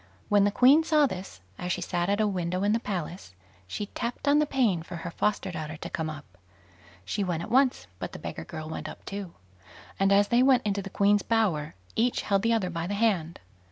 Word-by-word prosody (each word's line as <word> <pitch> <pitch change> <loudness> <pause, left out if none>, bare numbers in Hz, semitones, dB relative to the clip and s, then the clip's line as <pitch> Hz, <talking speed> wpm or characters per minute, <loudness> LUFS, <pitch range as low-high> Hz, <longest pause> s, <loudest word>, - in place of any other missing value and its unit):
When 205 -1 +5
the - - +4
Queen 260 +9 +6
saw 305 -2 +4
this, 185 - -6 0.2
as 180 0 -3
she 180 - -1
sat 175 +1 -1
at 205 +1 +1
a 215 - +3
window 180 -1 -1
in 205 - +3
the 230 - +2
palace, 180 - -5 0.3
she 205 - -4
tapped 235 +6 -5
on 290 +1 +5
the 300 - +2
pane 235 - +2
for 175 +2 -8
her 170 +1 -6
foster 205 +1 -1
daughter 155 -1 -5
to - - -7
come 160 -1 -2
up. 145 - -10 0.7
She 200 - -1
went 170 -3 -2
at - - -8
once, 260 - +3
but - - -5
the - - -8
beggar 80 - -6
girl 155 - -7
went 155 0 -5
up - - -12
too; 195 -3 -6 0.6
and 195 0 +3
as 200 +1 +4
they 240 +1 +4
went 255 -2 +4
into 200 -1 0
the 195 - -7
Queen's 205 +1 +3
bower, 190 - 0 0.2
each 240 +2 +1
held 195 -2 +2
the 230 +2 +1
other 205 -6 +1
by 170 0 -3
the 205 - -2
hand. 195 -7 0
195 Hz, 230 wpm, -27 LUFS, 170-225 Hz, 0.7 s, Queen